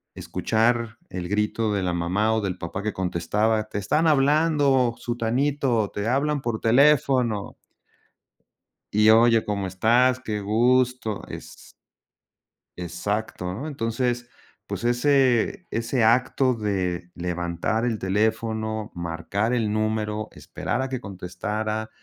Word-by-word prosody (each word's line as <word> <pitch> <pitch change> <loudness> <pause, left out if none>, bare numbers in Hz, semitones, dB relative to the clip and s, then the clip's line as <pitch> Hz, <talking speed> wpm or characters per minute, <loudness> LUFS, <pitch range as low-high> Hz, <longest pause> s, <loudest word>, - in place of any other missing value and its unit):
escuchar 115 0 0
el 90 -1 -5
grito 105 +1 0
de 100 - -1
la 90 -1 0
mamá 95 +6 +1
o 110 - +1
del 95 -2 -3
papá 90 +3 -5
que 110 -1 -2
contestaba: 105 +5 0
"Te 105 - -5
están 150 +11 +1
hablando, 140 -4 +3
Sutanito, 120 -1 0
te 105 +2 -3
hablan 140 +3 +1
por 115 -3 -3
teléfono" 130 -4 +3 1.4
Y 105 +1 +6
oye, 115 0 +5
¿cómo 100 -2 -2
estás? 120 +7 +3
Qué 105 -4 -4
gusto, 120 +1 +1
es - - -10 1.1
Exacto, 90 +1 -3
¿no? 135 +11 -5
Entonces, 120 -2 -2 0.4
pues, - - -5
ese 130 - +2
ese 115 +2 0
acto 125 +3 +3
de 95 -5 -2
levantar 90 +5 -2
el 115 -3 -1
teléfono, 110 +2 -1
marcar 85 +7 -2
el 110 -4 0
número, 110 0 -1
esperar 125 - -4
a 130 - -2
que 130 -2 -4
contestara, 105 +4 -4
110 Hz, 120 wpm, -24 LUFS, 100-125 Hz, 1.4 s, Y